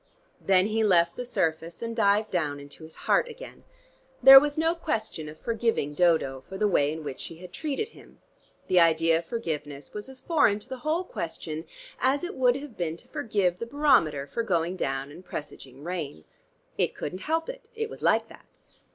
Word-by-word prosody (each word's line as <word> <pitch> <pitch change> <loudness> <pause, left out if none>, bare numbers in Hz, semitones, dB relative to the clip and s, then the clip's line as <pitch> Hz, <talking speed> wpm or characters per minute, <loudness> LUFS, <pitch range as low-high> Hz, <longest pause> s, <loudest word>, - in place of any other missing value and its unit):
Then 190 -1 +4
he 220 +1 +1
left 170 -4 +3
the 250 - -4
surface 165 -6 -2
and 230 0 -4
dived 210 -1 +2
down 150 -5 -1
into 145 +3 -12
his 160 0 -12
heart - - +3
again.... 485 +1 -11 0.6
There 270 +1 +12
was 290 +1 -2
no 325 +1 +2
question 220 - -3
of 155 - -12
forgiving 225 -10 -1
Dodo 155 -6 +2
for 190 - -6
the 210 +1 +2
way 145 -7 +2
in 160 0 -6
which 140 -3 -6
she 165 - -8
had 180 +2 -12
treated 315 +8 -3
him: - - -17 0.5
the 185 - +4
idea 165 -1 +4
of 170 - -9
forgiveness 150 -10 -5
was 210 +4 -7
as 265 -1 -10
foreign 290 -12 +3
to 210 - -10
the 260 - -5
whole 315 +6 0
question 160 - -5 0.3
as 270 +4 +2
it 355 - -4
would 250 -2 +3
have 275 -3 -7
been 165 -2 -3
to - - -17
forgive 195 -6 0
the 230 - -4
barometer 200 - +3
for 230 - -3
going 175 -5 0
down 135 -4 -3
and 175 +5 -12
presaging 140 -4 -8
rain. 160 - -5 0.6
It - - +1
couldn't 180 +5 -5
help 325 0 +1
it: - - -9
it 445 0 -2
was - - -11
like - - +3
that. - - -16
185 Hz, 195 wpm, -27 LUFS, 160-260 Hz, 0.6 s, There